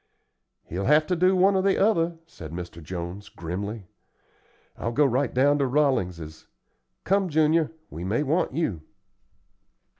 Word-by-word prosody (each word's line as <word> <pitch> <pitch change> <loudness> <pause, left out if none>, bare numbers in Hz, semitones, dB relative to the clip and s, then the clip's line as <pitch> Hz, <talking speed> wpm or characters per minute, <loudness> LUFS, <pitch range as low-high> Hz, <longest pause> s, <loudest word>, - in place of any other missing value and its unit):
"He'll 95 +4 -4
have 150 +3 +4
to 180 - 0
do 185 +2 +3
one 190 +2 +4
or 190 - +3
the 195 0 +2
other," 170 -5 +2
said 80 - -11
Mr. 85 0 -7
Jones, 90 +4 -6
grimly. 100 +5 -5 0.9
"I'll 115 - -4
go 145 +4 +4
right 135 +1 +1
down 145 +3 +3
to 140 - +2
Rolling's. 90 - -1 0.6
Come, 195 -1 +1
Junior, 155 0 +3 0.2
we 85 - -7
may 105 +10 0
want 155 +5 0
you." 130 - -2
135 Hz, 145 wpm, -25 LUFS, -, 0.9 s, have